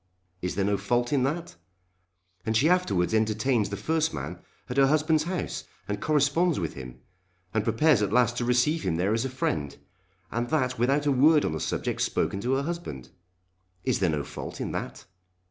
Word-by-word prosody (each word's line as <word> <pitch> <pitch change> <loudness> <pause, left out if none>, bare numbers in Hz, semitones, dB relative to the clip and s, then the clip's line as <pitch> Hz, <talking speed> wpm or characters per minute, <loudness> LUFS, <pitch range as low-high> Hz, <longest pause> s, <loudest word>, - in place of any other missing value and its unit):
Is 90 - -2
there 100 - +1
no 100 0 +1
fault 120 +6 0
in 140 - +3
that? 165 - -3 0.9
And 110 0 +1
she 140 - +4
afterwards 105 - +2
entertains 110 +1 +1
the 100 - -4
first 160 0 0
man 75 +6 -5 0.3
at 125 - -5
her 135 -1 +6
husband's 155 +1 +2
house, 180 0 -3 0.2
and 105 0 -3
corresponds 155 - +2
with 85 -4 -3
him, 65 -2 -9 0.5
and 110 - +1
prepares 115 +3 +3
at 105 - 0
last 120 +1 +3
to 125 - 0
receive 125 +7 +2
him 90 -3 -1
there 95 +5 +1
as 115 +3 0
a - - -2
friend, 75 - -2 0.5
and 120 +1 -2
that 130 -5 0
without 135 +5 +2
a 145 - +3
word 150 +3 +5
on - - 0
the 80 - -3
subject - - -2
spoken 100 - 0
to 125 +4 0
her 135 +1 +1
husband! 140 - -5 0.7
Is - - +1
there 95 -3 +2
no 75 -2 -1
fault - - -7
in - - -3
that? - - -5
120 Hz, 195 wpm, -27 LUFS, 100-150 Hz, 0.9 s, her